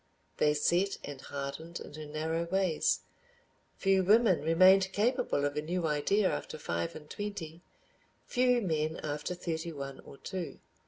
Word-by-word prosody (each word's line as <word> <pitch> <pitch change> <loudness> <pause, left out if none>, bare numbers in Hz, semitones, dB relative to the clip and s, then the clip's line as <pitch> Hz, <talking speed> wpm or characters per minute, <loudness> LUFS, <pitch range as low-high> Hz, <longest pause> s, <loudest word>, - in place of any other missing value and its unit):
They 150 0 +3
set 175 +6 +2
and 140 -2 -7
hardened 140 +5 -6
into 155 0 -8
narrow 160 +2 -2
ways. 185 -2 +1 0.8
Few 195 -1 +3
women 210 -1 +5
remained 185 +4 +5
capable 235 - +1
of 145 - -1
a 150 - 0
new 170 +2 -2
idea 160 +7 +2
after - - -3
five 85 - -3
and 150 -1 -10
twenty, 175 -5 -6 0.6
few 250 -1 +3
men 160 -4 -1
after 150 +4 -3
thirty 170 -1 -3
one 140 -3 -6
or 140 - -13
two. 180 +1 -5
165 Hz, 145 wpm, -31 LUFS, 150-190 Hz, 0.8 s, women